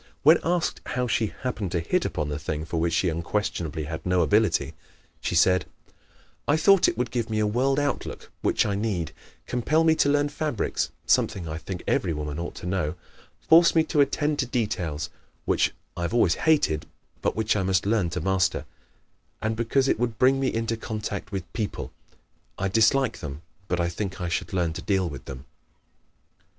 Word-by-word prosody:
When 160 +3 +7
asked 175 -1 0
how 125 0 -1
she 115 -3 0
happened 110 -8 -2
to 85 - +1
hit 85 - 0
upon 75 -1 -2
the 75 -1 -3
thing 75 +1 -3
for 85 0 -2
which 85 0 +1
she 90 - +2
unquestionably 85 -2 -2
had 80 +2 -5
no 90 -1 +2
ability, 105 -4 +2 0.5
she - - -2
said: 90 +1 +4 0.8
"I 145 - +4
thought 195 +3 +5
it - - -1
would 125 -1 -1
give 120 -2 -2
me 110 - -1
a 110 - +2
world 130 +6 +1
outlook 145 -2 -3
(which - - +2
I 100 - 0
need); 100 -6 -1 0.3
compel 150 +7 +1
me 160 -1 +5
to 145 - +2
learn 145 0 +2
fabrics 145 -6 -1 0.2
(something 90 -4 +2
I 80 +1 -4
think 90 +1 -6
every 90 -4 +1
woman 75 0 -4
ought 85 - -5
to - - -8
know); 90 -4 -1 0.5
force 165 +1 +7
me 160 - +5
to 150 -2 +2
attend 145 +1 +1
to 135 - +1
details 90 - -2 0.3
(which - - +2 0.2
I - - -5
have 85 +7 -1
always 95 -8 +4 0.2
hated 145 - +2 0.3
but - - 0
which 110 0 +1
I 105 - +1
must 95 0 +1
learn 105 -4 +2
to 90 0 -3
master); 95 +1 +1 0.7
and 110 +1 -1
because 120 +4 +1
it - - +1
would 115 -2 -1
bring 135 +1 +4
me 135 -1 +1
into 115 0 -1
contact 105 -2 -5
with 95 -3 -5
people 110 -3 -3 0.7
(I 95 - -1
dislike 115 +5 +3
them 75 +2 -7 0.2
but 90 - 0
think 95 +1 -4
I 90 -1 -2
should 90 - -2
learn 90 -4 0
to - - -6
deal 95 -3 +1
with 70 -6 -8
them)." 65 +1 -8
105 Hz, 190 wpm, -26 LUFS, 85-125 Hz, 0.8 s, When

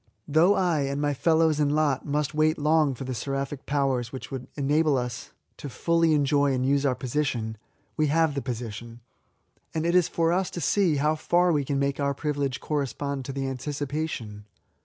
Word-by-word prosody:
Though 165 +7 +4
I, 175 -4 +1
and 140 0 -1
my 145 0 +1
fellows 160 +1 +2
in 145 -1 +2
lot, 150 -3 +1
must 150 +1 -1
wait 155 +1 +2
long 150 -2 +2
for 130 - -7
the 130 0 -4
seraphic 135 +3 -4
powers 135 -4 0
which 130 - -8
would 130 -2 -6
enable 150 +1 +2
us 125 -1 -4 0.3
fully 165 +4 0
to 155 - +4
enjoy 145 -1 +2
and 130 0 0
use 140 +1 +2
our 130 - +1
posi 135 +5 -1
tion, 110 -5 -3 0.4
we 155 - +2
have 160 +1 +2
the 140 - -2
position; 120 -1 -6 0.7
and 160 0 -1
it 170 - +1
is 180 -2 +4
for 165 0 +1
us 185 +1 0
to - - -6
see 170 +3 +2
how 150 +2 +2
far 175 +3 +2
we 145 -3 +1
can 140 +1 -2
make 140 0 0
our 140 0 0
privilege 140 -3 -2
correspond 140 -1 -3
to 135 - -4
the 135 0 -3
anticipation. 135 -5 -4
145 Hz, 195 wpm, -26 LUFS, 135-155 Hz, 0.7 s, Though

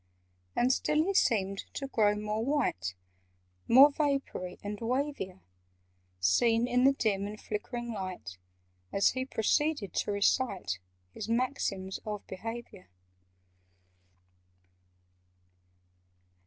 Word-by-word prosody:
And 250 +2 +3
still 300 +4 +2
he 395 +4 0
seemed 195 - +1
to 275 - -3
grow 215 -6 +2
more 210 +1 -2
white, 230 - 0 0.7
More 275 +5 +8
vapoury, 275 - -2
and 205 0 -4
wavier— 235 -6 -2 0.8
Seen 225 - +3
in 250 +1 +3
the 275 - +6
dim 200 -6 0
and 210 +1 -7
flickering 240 +3 -4
light, 185 - -6 0.5
As 195 - +4
he 260 0 -2
proceeded 265 0 0
to - - 0
recite 200 - +1 0.3
His - - -6
"Maxims 230 -6 -1
of 210 -1 -5
Behaviour." 225 0 -7
220 Hz, 100 wpm, -30 LUFS, 195-260 Hz, 0.8 s, More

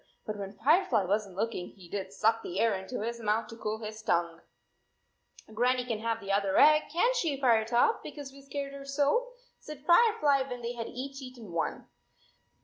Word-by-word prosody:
But 215 - -4
when 195 0 -6
Firefly 280 - +3
was 205 +3 0
n 190 - -13
t - - -16
looking 215 -4 -2
he 185 -4 -14
did 190 +1 -5
suck 225 +3 +2
the 180 +2 -4
air 230 0 +3
into 195 +4 -4
his 235 +1 -3
mouth 220 0 0
to 230 - -8
cool 215 -1 -3
his 215 0 -6
tongue! 170 -5 0 1.1
"Grannie 250 +2 +1
can 230 -3 -2
have 230 0 -1
the 200 -2 -5
other 195 -1 +1
egg, 305 0 +6
can 415 +10 +2
t - - 0
she, 300 - -1
Firetop, 240 - +3
because 285 -3 -8
we 275 +1 -14
scared 275 0 -5
her 280 0 -8
so," 285 - +1 0.3
said 300 -1 -10
Firefly, 345 - +4
when 245 -1 -6
they 235 +1 -3
had 235 -1 -5
each 270 +2 -6
eaten 250 -6 -10
one. 170 -1 -3
235 Hz, 200 wpm, -30 LUFS, 210-280 Hz, 1.1 s, egg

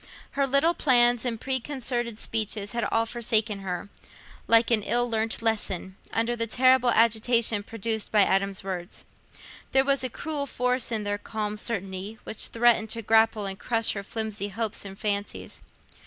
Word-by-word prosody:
Her 275 0 0
little 280 +6 +3
plans 245 -5 +4
and 230 -3 -2
preconcerted 250 -3 -2
speeches 215 -2 -2
had 235 0 -2
all 225 0 +1
forsaken 220 -3 0
her, 190 0 -5 0.6
like 230 +1 +4
an 225 -2 +3
ill 240 +4 +1
learnt 225 0 -2
lesson, 195 -4 -1 0.2
under 230 +1 0
the 230 -1 -2
terrible 255 +1 +4
agitation 230 -1 +3
produced 220 +1 -4
by 210 -2 +5
Adam's 195 0 0
words. 185 -2 -6 0.7
There 265 0 +4
was 275 -1 +2
a 255 - -2
cruel 290 +3 -4
force 250 0 0
in 220 -2 -1
their 205 0 -2
calm 210 -1 -4
certainty 200 -1 -3
which - - 0
threatened 230 -2 +2
to 230 +1 -3
grapple 220 -1 +3
and 195 0 -5
crush 230 -1 0
her 200 - -4
flimsy 210 0 -4
hopes 220 +1 -4
and 195 0 -8
fancies. 205 -1 -4
225 Hz, 160 wpm, -26 LUFS, 205-240 Hz, 0.7 s, by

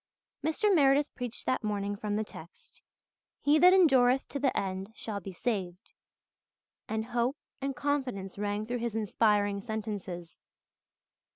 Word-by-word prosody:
Mr. 395 +7 +2
Meredith 285 -2 +4
preached 245 -2 -5
that 255 - 0
morning 205 -1 -1
from 205 0 -3
the 215 - 0
text, 170 -5 -14 0.6
"He 295 +2 +4
that 360 +2 +8
endureth 265 -8 +5
to 280 - -4
the 270 -1 +1
end 190 +1 -4
shall 210 -3 -5
be 195 +1 -8
saved," 190 -2 -3 1.0
and 220 0 -1
hope 245 +3 0 0.2
and 275 0 -2
confidence 250 -11 -2
rang 205 +1 -1
through 245 +2 -3
his 235 -2 -3
inspiring 205 -2 +2
sentences. 200 -6 -5
220 Hz, 135 wpm, -30 LUFS, 200-270 Hz, 1.0 s, that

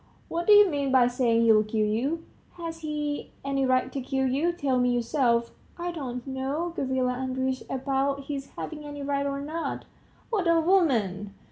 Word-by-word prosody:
What 340 +1 -2
do 425 - +8
you 415 0 +8
mean 285 -5 -1
by 260 -2 +6
saying 240 -2 +2
he'll 220 -2 +5
kill 215 0 0
you? 265 +10 -1 0.3
Has 330 -2 -6
he 300 -2 -3
any 275 -1 +1
right 255 0 +2
to 275 - -2
kill 265 +1 -1
you? 285 +7 +1
tell 280 -7 0
me 250 0 +3
yourself." 235 -1 +1 0.3
"I 350 0 -3
don't 250 -7 -5
know, 275 +6 -3
Gavrila 260 -3 0
Andreitch, 260 0 -2
about 275 +1 0
his 275 -1 -5
having 300 -2 -6
any 290 -1 -7
right 280 0 0
or 280 0 -3
not." 320 +3 -4 0.5
"What 395 -6 +1
a 335 0 +5
woman! 230 - +1
275 Hz, 175 wpm, -27 LUFS, 250-310 Hz, 0.5 s, do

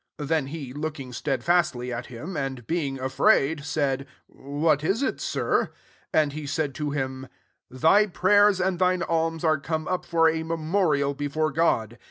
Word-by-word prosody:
'' - - -62
4 150 - -5
Then 155 -2 0
he, 140 -4 -7
looking 145 -3 -5
stedfastly 135 -1 0
at 120 +1 -5
him, 130 +10 -7
and 135 -4 -4
being 140 -3 -2
afraid, 145 +2 +2
said, 140 -2 -1
" - - -38 0.3
What 155 -2 +3
is 200 - +1
it, - - -2
Sir?" - - 0 0.4
And 150 -2 +2
he 150 -1 -6
said 145 -1 -1
to 150 +2 -3
him, 130 -2 -3 0.2
" - - -48
Thy 160 +11 +4
prayers 205 +1 +4
and 185 -1 0
thine 180 -1 +2
alms 165 0 -1
are 155 -2 +3
come 155 +2 -3
up 185 - -1
for 165 -1 +3
a 160 0 +1
memorial 160 -3 0
before 145 +2 -1
God. 120 -8 0
155 Hz, 180 wpm, -25 LUFS, 135-165 Hz, 0.4 s, Thy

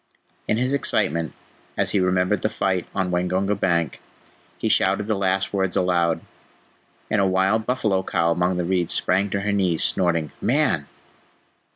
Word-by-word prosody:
In 105 - +1
his 130 +3 0
excitement, 85 - +1 0.4
as - - +1
he 100 - +2
remembered 90 +2 +1
the 110 - 0
fight 95 -4 -1
on 95 -2 0
Waingunga 90 +3 0
bank, 85 -5 0 0.6
he - - -2
shouted 105 - +2
the 110 - 0
last 95 -1 0
words 95 -2 0
aloud, 85 -2 +1 0.9
and 105 - +3
a 95 - +3
wild 95 +4 +1
buffalo 105 -7 +1
cow 85 -3 0
among 90 +2 +1
the 90 - -1
reeds 90 -1 0
sprang 95 +2 +1
to 100 0 -2
her 105 +1 -1
knees, 95 -5 +1
snorting, 85 -4 0
"Man!" - - +1
95 Hz, 160 wpm, -23 LUFS, 90-100 Hz, 0.9 s, and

